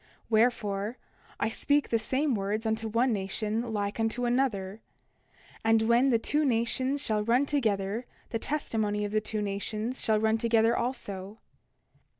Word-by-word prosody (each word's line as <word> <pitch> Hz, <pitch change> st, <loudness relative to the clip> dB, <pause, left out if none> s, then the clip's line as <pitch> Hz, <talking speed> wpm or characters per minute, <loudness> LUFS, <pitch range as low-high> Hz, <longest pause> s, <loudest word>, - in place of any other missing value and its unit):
Wherefore, 220 Hz, -1 st, +1 dB, 0.4 s
I -, -, +1 dB
speak 285 Hz, +5 st, +1 dB
the 230 Hz, -, +2 dB
same 265 Hz, +5 st, 0 dB
words 210 Hz, +2 st, -2 dB
unto 220 Hz, 0 st, -1 dB
one 230 Hz, +3 st, +2 dB
nation 215 Hz, +4 st, -2 dB
like 205 Hz, 0 st, -2 dB
unto 225 Hz, +2 st, 0 dB
another. 225 Hz, -5 st, 0 dB, 0.8 s
And 225 Hz, 0 st, +4 dB
when 235 Hz, +4 st, +4 dB
the 235 Hz, -, +4 dB
two 295 Hz, +7 st, 0 dB
nations 260 Hz, +2 st, +1 dB
shall 215 Hz, -1 st, +1 dB
run 240 Hz, +5 st, +3 dB
together 220 Hz, -5 st, -1 dB, 0.2 s
the 225 Hz, -, -1 dB
testimony 220 Hz, -7 st, -1 dB
of 205 Hz, -, -4 dB
the 215 Hz, 0 st, +1 dB
two 215 Hz, 0 st, -3 dB
nations 215 Hz, +4 st, -3 dB
shall 215 Hz, -1 st, +3 dB
run 220 Hz, +1 st, +2 dB
together 230 Hz, 0 st, +3 dB
also. 205 Hz, -5 st, -4 dB
225 Hz, 150 wpm, -29 LUFS, 210-245 Hz, 0.8 s, And